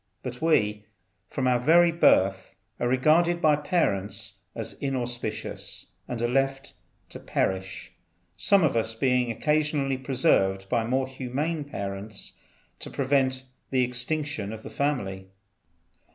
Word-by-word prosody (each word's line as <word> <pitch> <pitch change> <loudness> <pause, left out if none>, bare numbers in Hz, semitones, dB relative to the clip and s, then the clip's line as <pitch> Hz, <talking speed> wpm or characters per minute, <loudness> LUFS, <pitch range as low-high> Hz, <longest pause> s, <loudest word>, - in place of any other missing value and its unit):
But 125 -1 -6
we, 105 -10 +2 0.4
from 130 -2 -1
our 125 -1 +3
very 170 +6 +5
birth, 95 - +3 0.2
are 120 - 0
regarded 155 +7 +3
by 155 -2 +4
our 145 - -1
parents 105 - -1 0.2
as 115 -1 -4
inauspicious, 120 -5 -4 0.2
and 120 - -4
are - - +3
left 135 +2 0 0.4
to - - -9
perish, 95 0 -2 0.4
some 195 - +4
of 155 - +2
us 115 0 0
being 125 0 +1
occasionally 150 +1 0
preserved 95 -8 +1
by 115 -2 +1
more 130 +2 +1
humane 140 +4 -3
parents 100 -4 -6 0.5
to - - -6
prevent 130 -1 +1 0.3
the 130 -1 +2
extinction 125 -2 -1
of 110 0 -8
the - - -8
family." 100 -10 -2
125 Hz, 130 wpm, -26 LUFS, 110-145 Hz, 0.5 s, very